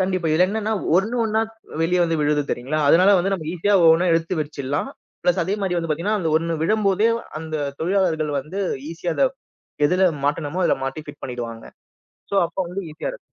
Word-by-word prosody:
கண்டிப்பா. 185 -3 0
இதுல 180 +4 +4
என்னன்னா 220 +1 -1
ஒ - - -5
ஒண்ணு 215 +6 +1
ஒண்ணா 220 0 +1
த் 225 - -22 0.3
வெளிய 180 +2 +2
வந்து 165 -1 0
விழுது 150 0 +2
தெரியுங்களா? 140 +6 -2
அதனால 185 +5 +6
வந்து 195 +3 0
நம்ப 160 -5 -6
ஈசியா 200 +4 +1
ஒவ்வொண்ணா 165 +2 +5
எடுத்து 165 +1 0
வெர்ச்சிரலாம். 145 -1 -3 0.3
ப்ளஸ் 180 +1 +2
அதே 195 +3 -1
மாதிரி 180 -2 0
வந்து 165 -1 -3
பாத்தீங்கன்னா 200 +8 0
அந்த 160 -2 0
ஒண்ணு 165 0 -1
விழும்போதே 210 +2 +2 0.3
அந்த 160 -1 -6 0.3
தொழிலாளர்கள் 165 -4 +1
வந்து 180 +9 -6 0.3
ஈசியா 170 0 -3
அத 275 - +4 0.6
எதுல 185 +3 +3 0.2
மாட்டணுமோ, 145 +4 -1
அதுல - - +2
மாட்டி 135 +4 -4
ஃபிட் 145 - -11
பண்ணிடுவாங்க. 120 -3 -6 0.7
சோ, - - -3
அப்ப - - -20
வந்து 190 +3 -4
ஈசியா 155 - -7
இருக்கும். - - -9
170 Hz, 190 wpm, -22 LUFS, 155-195 Hz, 0.7 s, அதனால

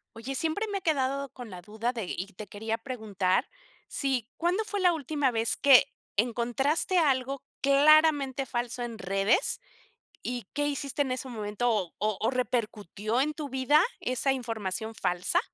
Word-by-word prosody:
Oye, 250 +4 -5
siempre 325 +8 0
me 395 - -1
he - - -27
quedado 275 -3 0
con 245 -4 -9
la 180 - -8
duda 220 +6 -3
de 225 -5 -3
y 185 - -4
te 205 +3 -8
quería 220 +3 -3
preguntar 215 -7 -1 0.4
si 260 -5 -1
¿cuándo 355 +6 +1
fue 410 -1 -3
la 360 -2 +5
última 290 -2 0
vez 225 -1 +1
que 275 -2 +7 0.3
encontraste 245 - +1
algo 275 -4 +1 0.2
claramente 280 -1 +5
falso 240 0 -3
en 235 -2 -5
redes, 195 - +1 0.6
y 245 -4 -4
qué 290 0 0
hiciste 280 0 -1
en 265 -2 -2
ese 255 +1 -4
momento, 220 0 -1
o 200 -6 0
o, 215 +2 0
repercutió 225 -3 -1
en 300 +3 +1
tu 300 -2 -5
vida 265 +4 +4 0.2
esa 255 +2 +1
información 225 -4 -3
falsa? 180 -3 +1
250 Hz, 160 wpm, -28 LUFS, 220-280 Hz, 0.6 s, que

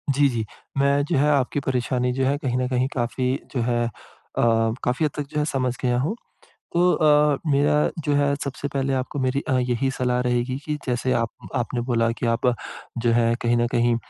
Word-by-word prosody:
जी, 145 +1 +5
जी। 115 -3 -2 0.3
मैं 140 +1 +3
जो 145 - 0
है, 145 +2 +3
आपकी 140 0 +1
परेशानी 125 -1 0
जो 135 +1 0
है, 140 +2 +1
कहीं 130 -5 -2
न 125 0 0
कहीं 125 0 +1
काफ़ी 125 +1 0 0.2
जो 125 - +1
है 120 0 +1 0.5
अ, - - +3 0.4
काफ़ी 125 +6 0
हद 150 - 0
तक 145 -1 -4
जो 150 -1 -2
है, 150 - +1
समझ 130 -4 -1
गया 125 -1 +1
हूँ। 155 - -1 0.6
तो 180 +1 +4
अ, 150 -2 +4
मेरा 145 +1 +3 0.3
जो 145 - +1
है, 140 0 +2
सबसे 140 +1 -4
पहले 135 0 0
आपको 130 +2 -3
मेरी 130 +1 +1
अ, 130 -1 +2
यही 125 +1 0
सलाह 125 -1 +1
रहेगी 125 +2 0
कि 150 -1 -2
जैसे 125 +1 0
आप 115 -1 0 0.2
आपने 120 0 -1
बोला 115 -1 +2
कि - - 0
आप 115 +2 +1 0.5
जो 120 0 +2
है, 115 0 +3
कहीं 120 0 +2
न 120 0 +2
कहीं 120 0 +3
130 Hz, 210 wpm, -23 LUFS, 120-140 Hz, 0.6 s, जी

